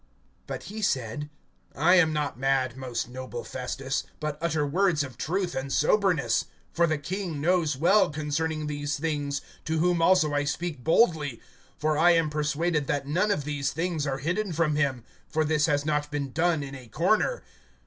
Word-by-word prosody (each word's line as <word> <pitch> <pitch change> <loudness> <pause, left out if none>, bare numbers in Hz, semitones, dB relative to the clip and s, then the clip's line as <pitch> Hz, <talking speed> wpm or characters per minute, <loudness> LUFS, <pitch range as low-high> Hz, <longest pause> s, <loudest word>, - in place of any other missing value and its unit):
(25)But - - -5
he 215 +2 -7
said: 135 - -1 0.5
I 165 +6 +4
am 180 -4 +5
not 150 -5 -2
mad, 130 -2 +1
most 130 -4 -3
noble 125 -1 -6
Festus; 130 +1 -3 0.2
but 150 -1 -2
utter 155 -3 +1
words 165 +1 +2
of 130 -3 -8
truth 180 +2 -2
and 135 +1 -4
soberness. 180 0 +2 0.3
(26)For 170 -1 +3
the 155 - +1
king 175 +1 -4
knows 160 -3 +1
well 195 +8 +4
concerning 155 +1 -2
these 145 -1 -2
things, 145 -2 -2 0.2
to 160 0 0
whom 175 +1 +2
also 165 -4 +4
I 145 0 +1
speak 150 -2 -3
boldly; 160 - +2 0.4
for 155 -1 0
I 175 +2 +6
am 165 -2 +2
persuaded 150 0 0
that 145 -1 -1
none 180 +9 +1
of 150 -8 0
these 145 -1 -2
things 165 -3 -1
are 135 -1 -1
hidden 180 +7 -1
from 155 -2 +1
him; 135 -5 0 0.3
for 155 0 +1
this 150 0 +2
has 145 -2 +1
not 150 -1 0
been 145 -2 -3
done 160 0 +1
in 135 -1 -7
a 130 -3 -10
corner. 210 - +1
150 Hz, 180 wpm, -27 LUFS, 140-170 Hz, 0.5 s, I